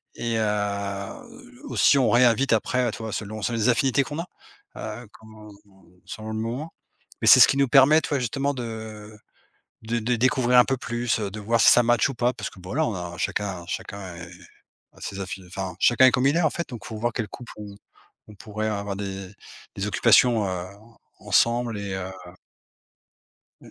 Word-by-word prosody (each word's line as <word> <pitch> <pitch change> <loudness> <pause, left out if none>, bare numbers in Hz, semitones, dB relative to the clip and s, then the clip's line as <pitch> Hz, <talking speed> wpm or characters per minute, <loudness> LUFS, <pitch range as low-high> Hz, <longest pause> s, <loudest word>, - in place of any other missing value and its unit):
et 115 -1 -2
heu, 105 - -4
aussi, 155 - +3
on 130 -4 +3
réinvite 120 +2 +4
après, 125 +3 +1
heu, - - -1
tu - - -9
vois? 110 -1 -5
Selon 110 0 -5
selon 115 +2 -2
les 115 +2 +2
affinités 135 +2 +2
qu'on 150 +3 -6
a, 170 - -4 0.5
heu, 110 +2 -7
comment, 110 -1 -14
heu, 95 -3 -22
selon 110 +3 -8
le 110 - -4
moment, 120 +9 -4 0.5
mais - - 0
c'est - - +9
ce - - +9
qui - - +1
nous 140 -1 +3
permet, 145 +4 +6
tu - - -5
vois? 145 - 0
Justement, 135 +4 -1
de, 125 -3 -5
heu, 110 -2 -8 0.7
de 115 +1 -2
de 120 +2 0
découvrir 125 +1 +2
un 125 - +6
peu 135 - -1
plus, 120 -1 -2
heu, 105 -2 -3
de 105 - -7
voir 115 +2 +1
si - - +7
ça 120 - +6
matche 120 +2 +2
ou 135 - -6
pas, 120 +2 +1
parce - - -6
que, - - -16
bon, 90 0 -11
voilà, 155 +8 0
on 110 - -3
a 90 -1 -6
chacun 90 +1 -3
chacun 95 -1 -6
est 85 +1 -9 0.7
a - - -19
ses 100 - -6
affini 95 0 -7
enfin, 95 -1 -5
chacun 130 +2 +5
est - - +5
comme 130 +1 +1
il 140 - +2
est, - - +2
en 155 - +3
fait, 170 - -5
donc 120 -5 -9
faut 110 - -7
voir 120 +2 -1
quel 115 -3 -3
couple 120 +3 -10
on 105 -1 -9 0.5
on 105 - -13
pourrait, 110 +2 -5
heu, - - -1
avoir 100 -1 -4
des 95 -1 -6 0.4
des 100 +1 -3
occupations, 115 +1 +4
heu, 90 -1 -4 0.5
ensemble 115 +3 +1
et 100 -1 -5
heu 95 0 -5 1.5
Mmh. - - -15
110 Hz, 215 wpm, -24 LUFS, 100-125 Hz, 1.5 s, c'est